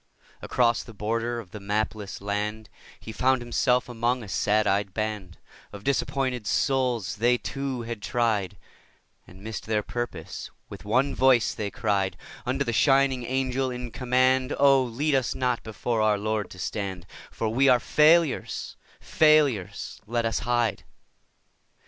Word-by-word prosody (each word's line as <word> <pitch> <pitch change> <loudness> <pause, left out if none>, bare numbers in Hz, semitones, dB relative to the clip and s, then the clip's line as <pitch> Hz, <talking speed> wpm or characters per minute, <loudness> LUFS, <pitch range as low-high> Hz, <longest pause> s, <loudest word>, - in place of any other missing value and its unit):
Across 120 -1 +2
the 115 - -13
border 115 +3 -2
of 100 -6 -11
the 105 - -8
mapless 105 0 -3
land 105 +2 -3 0.3
He 110 - -8
found 130 +4 +2
himself 125 +1 +1
among 120 +1 -1
a - - -9
sad 105 +2 +1
eyed 100 -1 0
band 105 -5 -4 0.3
Of 100 -1 -10
disappointed 130 -3 -1
souls; 125 -9 0
they, 120 +3 +3
too, 135 -2 -4
had 115 -2 -6
tried 105 -4 0 0.7
And 95 +2 -15
missed 110 0 -6
their 105 -1 0
purpose. 120 +2 -5 0.2
With - - -10
one 130 +6 +2
voice 130 -3 +3
they 105 -2 -3
cried 100 -5 -1 0.3
Unto 135 +2 0
the 120 - -1
shining 135 +1 +3
Angel 130 0 -1
in 125 -1 -6
command: 130 +2 +2
'Oh, 140 -1 +5
lead 130 +5 -1
us 130 -3 +1
not 125 -2 0
before 110 +1 -2
our 105 -1 +3
Lord 105 0 -2
to - - -12
stand, 95 -1 -4 0.2
For 115 - -3
we 135 +5 +3
are 125 -1 +5
failures, 155 +3 +2 0.2
failures! 150 - +2
Let 120 +1 -1
us 115 - 0
hide. 120 -3 0
120 Hz, 150 wpm, -26 LUFS, 105-130 Hz, 0.7 s, Oh